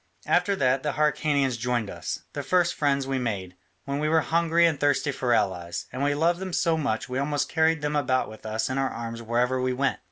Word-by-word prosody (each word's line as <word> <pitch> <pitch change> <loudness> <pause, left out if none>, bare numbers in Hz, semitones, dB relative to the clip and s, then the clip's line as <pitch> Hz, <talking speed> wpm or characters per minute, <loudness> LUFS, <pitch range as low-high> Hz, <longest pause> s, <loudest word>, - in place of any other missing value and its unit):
After 180 +3 +2
that 130 -5 +2
the 150 -1 -2
Hyrcanians 145 -4 +1
joined 120 -2 -1
us, - - -5
the - - -3
first 180 -2 +2
friends 140 -2 +1
we 135 -1 -1
made, 100 -7 -3 0.3
when 140 +1 -2
we 155 +1 0
were 160 0 +4
hungry 170 +1 +2
and 160 -4 +1
thirsty 145 0 +2
for 130 -2 -2
allies, 90 -6 0
and 130 +2 -2
we 145 0 +2
loved 170 +3 +2
them 190 -1 -5
so 165 -1 +2
much 140 -8 -1
we 130 +1 -2
almost 145 0 -1
carried 160 -1 +2
them 150 0 -1
about 130 -3 +1
with 110 - -12
us 110 0 -2
in 130 +1 -2
our 135 -1 +1
arms 115 0 -6
wherever 120 +3 0
we 130 0 0
went. 135 +1 0
140 Hz, 225 wpm, -26 LUFS, 125-155 Hz, 0.3 s, were